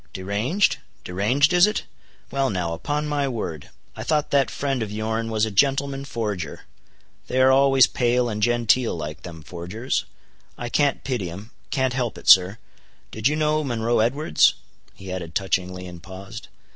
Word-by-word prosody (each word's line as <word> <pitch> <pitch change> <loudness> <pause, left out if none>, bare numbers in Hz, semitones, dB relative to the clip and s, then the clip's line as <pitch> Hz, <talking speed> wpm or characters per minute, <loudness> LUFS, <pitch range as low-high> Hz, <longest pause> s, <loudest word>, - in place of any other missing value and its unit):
"Deranged? 105 - 0 0.3
deranged 125 - +2
is 180 +3 +6
it? 210 - -2 0.5
Well 135 -1 +1
now, 90 -3 -2
upon 145 - -2
my 145 -1 0
word, 105 - -5 0.3
I - - -7
thought 150 -1 0
that 140 -3 +3
friend 135 -3 -2
of 105 -2 -3
yourn 110 +1 -2
was 110 -1 +1
a 110 - -4
gentleman 135 +5 +1
forger; 105 - -4 0.7
they 130 - -1
are 130 0 +6
always 135 -1 +6
pale 125 0 +1
and 105 -2 -3
genteel 120 -1 +2
like, 75 -1 -6
them 80 -3 -10
forgers. 90 - -3 0.5
I 120 - -5
can't 145 +2 +1
pity'em—can't 120 - -3
help 125 -3 -2
it, - - -12
sir. 95 +2 +7 0.5
Did 110 +2 0
you 150 - +1
know 155 0 +1
Monroe 120 -3 0
Edwards?" 120 - +3 0.4
he 95 -1 -9
added 85 -3 -6
touchingly, 90 -1 -1
and 90 -1 -10
paused. 95 +6 -10
115 Hz, 160 wpm, -23 LUFS, 95-135 Hz, 0.7 s, sir